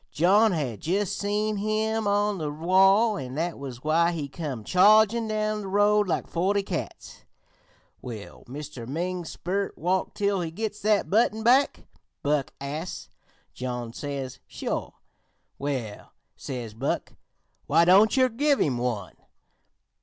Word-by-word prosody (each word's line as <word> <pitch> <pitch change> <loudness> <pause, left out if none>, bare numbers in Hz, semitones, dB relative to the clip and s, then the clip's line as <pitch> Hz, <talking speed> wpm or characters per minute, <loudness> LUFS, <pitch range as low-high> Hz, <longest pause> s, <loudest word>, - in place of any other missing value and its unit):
John 200 +7 +4
had 135 - -3
jus' 190 +4 0
seen 210 +1 -1
him 215 +1 0
on 205 -1 +1
the 155 -2 -2
wall, 195 +7 +4
an' 130 -1 -6
that 165 +1 -2
was 130 -3 -8
why 165 +3 +3
he 150 -4 -3
come 140 -6 -5
chargin' 215 - +5
down 215 0 -1
the 200 - -6
road 205 +1 +3
like 175 - -1
forty 195 +4 0
cats. 180 -3 -6 0.8
"'Will 110 -5 -9
Mr. 135 -2 -8
Ming's 175 +4 -3
sperrit 195 +3 -2
walk 180 +3 -1
till 200 -2 0
he 165 - -3
gits 210 +4 -5
that 210 -2 +1
button 220 +1 +2
back?' 260 +5 +3 0.4
Buck 145 -1 0
asts. 150 +5 -5 0.4
John 125 -2 -5
says: 140 -2 -5
'Sure.' - - -4 0.6
"'Well,' 130 -7 -4 0.2
says 120 -5 -6
Buck, 125 +6 -3 0.5
'why 165 +3 +4
don't 200 +7 +5
yer 260 -1 +5
give 280 +4 +1
him 130 -5 +1
one?' 115 -7 -3
180 Hz, 140 wpm, -26 LUFS, 140-210 Hz, 0.8 s, chargin